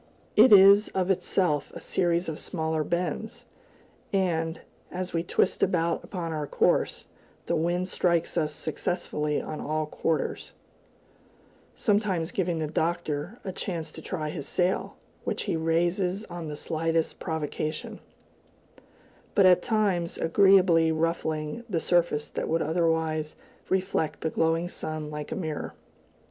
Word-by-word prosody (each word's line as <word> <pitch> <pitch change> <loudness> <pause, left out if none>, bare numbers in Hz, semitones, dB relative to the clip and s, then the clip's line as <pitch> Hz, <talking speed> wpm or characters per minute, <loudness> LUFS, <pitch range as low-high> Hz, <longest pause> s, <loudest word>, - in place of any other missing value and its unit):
It 260 - +7
is 200 +1 +8
of 190 0 +2
itself 175 -5 0
a - - -6
series 175 0 0
of 160 -2 -4
smaller 160 -2 -2
bends, 175 +7 -3 0.7
and, 165 -4 0 0.3
as 180 0 -4
we 165 - +1
twist 175 +2 +1
about 170 -2 +1
upon 170 -4 -4
our 150 -2 -3
course, - - +1 0.4
the 170 - 0
wind 175 +3 0
strikes 170 -3 +1
us 155 -3 +1
successively 150 -1 -2
on 155 - -6
all 155 +1 -1
quarters; 160 +1 -2 1.2
sometimes 200 -6 +1
giving 175 -3 -1
the 160 - -1
Doctor 160 +3 -2
a 190 - -4
chance 170 -4 -4
to - - -10
try 155 -4 -4
his 150 -4 -5
sail, 180 +1 0 0.3
which - - -2
he - - -1
raises 175 +5 0
on 175 -2 -7
the 150 - -5
slightest 165 +1 -1
provocation, 155 -1 -4 1.4
but 200 - +6
at 180 -1 +7
all - - -14 0.2
times 180 -5 0
agreeably 180 -2 +5
ruffling 160 +3 -1
the 175 -5 0
surface 170 -4 +1
that - - -4
would 165 +1 +1
otherwise 160 -1 0 0.3
reflect 185 -4 0
the 160 - -1
glowing 165 +1 +1
sun 155 -3 -5
like 150 -1 -6
a - - -2
mirror. 155 -5 -4
165 Hz, 135 wpm, -27 LUFS, 155-180 Hz, 1.4 s, is